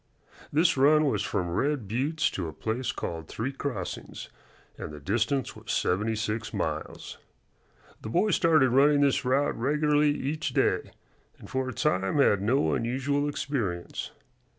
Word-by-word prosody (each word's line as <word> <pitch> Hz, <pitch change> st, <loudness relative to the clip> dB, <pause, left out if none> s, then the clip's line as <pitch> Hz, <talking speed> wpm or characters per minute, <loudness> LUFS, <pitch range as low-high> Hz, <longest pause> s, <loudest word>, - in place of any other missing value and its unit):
This 160 Hz, +1 st, +3 dB
run 150 Hz, +3 st, +5 dB
was 140 Hz, -, +1 dB
from 95 Hz, -4 st, -1 dB
Red 135 Hz, -, -1 dB
Buttes 140 Hz, +9 st, 0 dB
to 90 Hz, -3 st, -3 dB
a 80 Hz, -, -7 dB
place 115 Hz, -, -2 dB
called 80 Hz, -2 st, -5 dB
Three 125 Hz, +5 st, -3 dB
Crossings, 130 Hz, -9 st, -5 dB, 0.5 s
and -, -, -7 dB
the 75 Hz, -, -9 dB
distance 120 Hz, -, -1 dB
was -, -, -7 dB
seventy 105 Hz, +5 st, 0 dB
six 110 Hz, +1 st, -3 dB
miles. -, -, -4 dB, 0.8 s
The -, -, -6 dB
boy 205 Hz, -, +2 dB
started 155 Hz, -7 st, +4 dB
running 145 Hz, +3 st, +5 dB
this 140 Hz, -2 st, +2 dB
route 135 Hz, +3 st, +1 dB
regularly 150 Hz, +4 st, +2 dB
each 145 Hz, +1 st, -2 dB
day, -, -, +1 dB, 0.5 s
and -, -, -12 dB
for 130 Hz, 0 st, -2 dB
a -, -, -5 dB
time 95 Hz, +4 st, 0 dB
had 105 Hz, -8 st, +4 dB
no 105 Hz, -, +2 dB
unusual 135 Hz, -, 0 dB
experience. 110 Hz, -12 st, -3 dB
130 Hz, 150 wpm, -27 LUFS, 105-145 Hz, 0.8 s, run